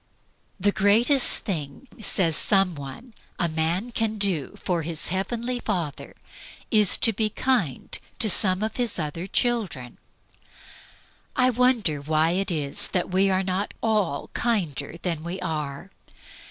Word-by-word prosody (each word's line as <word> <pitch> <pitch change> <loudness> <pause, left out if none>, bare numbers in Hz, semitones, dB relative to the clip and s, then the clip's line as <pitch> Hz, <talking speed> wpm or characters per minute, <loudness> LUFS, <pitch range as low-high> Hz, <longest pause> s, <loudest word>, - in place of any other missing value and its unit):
"The 205 +2 +2
greatest 225 +7 +3
thing," 165 - -4
says 170 -6 +1
some 195 -1 +3
one, 160 - -10 0.2
"a 175 - +1
man 165 +8 -1
can 225 -1 -1
do 190 -9 -1
for 175 -2 -1
his 160 -1 -3
Heavenly 235 +7 -2
Father 175 - -4 0.6
is 210 -3 +5
to 225 - +3
be 215 +1 0
kind 210 - -1 0.2
to 225 - +5
some 190 0 +5
of 220 0 -3
His 240 -4 +1
other 165 +2 -4
children." 200 - -1 1.4
I 255 0 +3
wonder 235 - +1
why 155 +2 +1
it 195 +3 0
is 150 -5 +2
that 180 -1 -2
we 190 +1 +3
are 190 0 +1
not 190 +2 -3
all 210 -11 0
kinder 170 - -1
than 165 -4 -2
we 175 +3 -5
are? 155 0 -5
190 Hz, 140 wpm, -24 LUFS, 160-220 Hz, 1.4 s, is